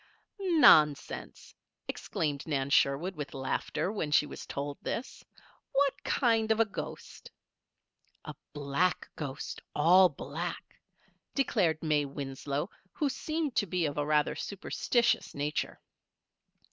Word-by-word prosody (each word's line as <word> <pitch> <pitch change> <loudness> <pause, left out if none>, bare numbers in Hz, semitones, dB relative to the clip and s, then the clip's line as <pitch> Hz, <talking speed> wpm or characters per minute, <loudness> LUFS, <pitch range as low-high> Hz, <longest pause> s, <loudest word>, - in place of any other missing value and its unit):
"Nonsense!" 295 - +4 0.3
exclaimed 145 -2 -3
Nan 140 -3 -1
Sherwood, 145 +8 +2
with 145 -3 -6
laughter, 135 +7 -2
when 195 -8 -2
she 150 0 +4
was - - -9
told 140 0 -4
this. 240 - -5 0.5
"What 280 0 +3
kind 225 -4 +2
of 220 - +2
a 225 - +5
ghost?" 205 - -8 1.0
"A - - -6 0.2
black 145 +5 0
ghost 140 -3 -5
all 180 +5 +6
black," 160 +4 -6 0.6
declared 185 - +1
May 150 -2 +2
Winslow, 140 +2 -4 0.3
who 295 - 0
seemed 310 +2 -2
to 205 - +2
be 180 -1 0
of 145 -1 -2
a - - +1
rather 150 -1 +2
superstitious 235 +4 0
nature. 145 +1 -2
155 Hz, 120 wpm, -30 LUFS, 145-220 Hz, 1.0 s, all